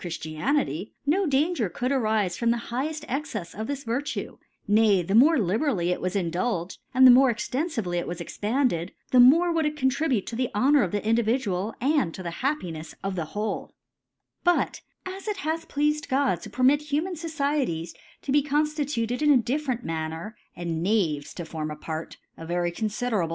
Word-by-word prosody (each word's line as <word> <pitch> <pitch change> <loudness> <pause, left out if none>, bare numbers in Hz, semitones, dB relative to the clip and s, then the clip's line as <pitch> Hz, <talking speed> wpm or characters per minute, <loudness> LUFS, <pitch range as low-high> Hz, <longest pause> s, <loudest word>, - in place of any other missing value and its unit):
Chiftmity^ 175 - -2
no 355 +6 +2
Danger 280 - +1
could 245 +9 -2
«rifc 215 -8 +1
from 235 - 0
the 235 - +2 0.2
higheft 305 +4 -2
Exccfs 235 - -4
of 220 +2 -5
this 280 -1 -4
Vir 235 +3 -1
tue; 290 - -5 0.3
nay 205 -3 +4
the 195 - -3
mote 290 +9 +6
liberally 205 - +1
it - - -2
was 185 +2 -2
indulged^ 180 +1 -1
and 260 +1 +6
the 255 - +11
ipoi^ 260 +2 +6
extenfively 225 - -2
it - - -4
was 175 0 -5
expanded, 205 -2 -1 0.2
the 255 - +5
more* 325 +8 +7
would 325 -2 +1
it 300 0 -4
contribute 265 -4 +1
to 230 - -6
the 250 +1 0
Hpr 255 +7 +3
noiir 290 -3 +5
'of 180 - -2
the 205 - -1
Indtvjidu^], 220 -3 0
aiid 270 - +1
to^ 185 - -7
the 170 - -4
Happi* 270 - -1
«d3 155 0 -9
of 195 -1 -2
the 170 -3 -2
wbde» 210 +6 -3 0.7
But 350 0 +1 0.2
as 380 +2 -7
it 420 -2 -1
bath 325 +1 -2
plea&d 300 +1 +1
God 270 +1 +1
to - - -8
permit 260 +3 +3
kuman 300 +5 -2
SocieCj[e$ 280 - -2 0.3
to 275 - -3
be 290 +1 +5
cppftitiited 290 -4 -1
in 300 - +3
a 285 - +7
dif 265 +5 -1
lerent 245 -2 -1
Manner, 160 +5 -4 0.2
and 170 -2 -3
Knaves 170 -7 0
to 170 - -5
form 155 -1 -4
a 150 - -5
Part^ 160 +1 -6 0.2
(a. 165 - -7
very 175 0 0
confidecable 215 -1 -1
235 Hz, 190 wpm, -26 LUFS, 180-290 Hz, 0.7 s, the